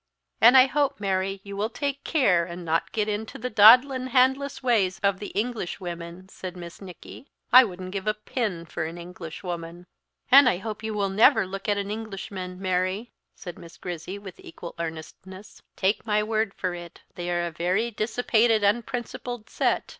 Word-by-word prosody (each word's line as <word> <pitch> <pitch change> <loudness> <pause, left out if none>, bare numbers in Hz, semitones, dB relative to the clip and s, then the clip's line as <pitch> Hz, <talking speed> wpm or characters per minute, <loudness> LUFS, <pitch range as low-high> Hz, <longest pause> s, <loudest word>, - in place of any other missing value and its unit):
"And 240 +4 +8
I 255 - +9
hope, 280 -1 0
Mary, 195 -1 -1
you 200 0 -8
will 210 +2 -1
take 280 +3 -3
care 200 - +3
and 175 0 -7
not 165 +1 0
get 215 -2 -1
into 215 +1 -4
the 250 +2 -5
daadlin' 250 +5 +7
handless 265 +2 +2
ways 210 -7 +2
of 200 -1 +2
the 205 - -5
English 220 -5 -2
women," 175 0 -7
said 185 -1 -8
Miss 170 +1 -10
Nicky; 195 - -11 0.3
"I 255 +1 +11
wouldn't 185 -4 -6
give 195 +1 -5
a 215 - +2
pin 210 -5 -3
for 160 - -4
an 165 +2 -6
Englishwoman." 175 0 -7 0.5
"And 270 -1 +9
I 180 - 0
hope 215 +2 -6
you 220 -1 -4
will 200 -1 0
never 220 +5 +5
look 195 +2 -6
at 205 - +2
an 200 0 -3
Englishman, 195 -4 -6
Mary," 185 +4 -1 0.2
said 175 -3 -9
Miss 170 - -13
Grizzy, 175 +2 -6
with 195 -3 -11
equal 170 +1 -10
earnestness; 170 +4 -8
"take 195 +2 0
my 210 -1 +1
word 215 -1 -1
for 185 -2 -2
it 175 -1 -10
they 175 0 -5
are 175 0 0
a 170 - -4
very 185 +8 0
dissipated, 225 0 +1
unprincipled 235 +1 -2
set. - - +1
200 Hz, 180 wpm, -25 LUFS, 180-225 Hz, 0.5 s, I